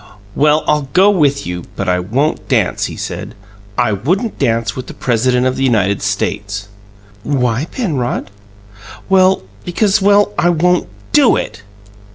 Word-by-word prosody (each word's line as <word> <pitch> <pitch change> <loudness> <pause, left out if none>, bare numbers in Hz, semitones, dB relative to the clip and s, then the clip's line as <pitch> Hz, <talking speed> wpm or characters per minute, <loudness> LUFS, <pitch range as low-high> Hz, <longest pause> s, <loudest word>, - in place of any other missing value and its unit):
"Well, 150 +4 +3
I'll 150 -3 +1
go 195 +3 +5
with 145 -7 +1
you; 90 0 -5
but 100 - -3
I 90 0 +2
won't 125 +12 -1
dance," - - +1
he - - -6
said - - -6 0.4
"I 120 -3 +2
wouldn't 180 - -1
dance 115 -4 0
with 130 -1 -6
the - - -9
President 125 +1 +1
of 130 0 0
the 135 - -1
United 100 -6 +1
States" 100 0 -3 0.5
"Why, 125 0 0
Penrod?" 145 - -2 0.8
"Well 190 - +4 0.2
because 195 +3 +1
well, 205 +1 +4
I 175 0 +3
won't 175 +1 +2 0.2
DO 285 -5 +5
it!" 105 -1 -4
135 Hz, 150 wpm, -16 LUFS, 110-180 Hz, 0.8 s, go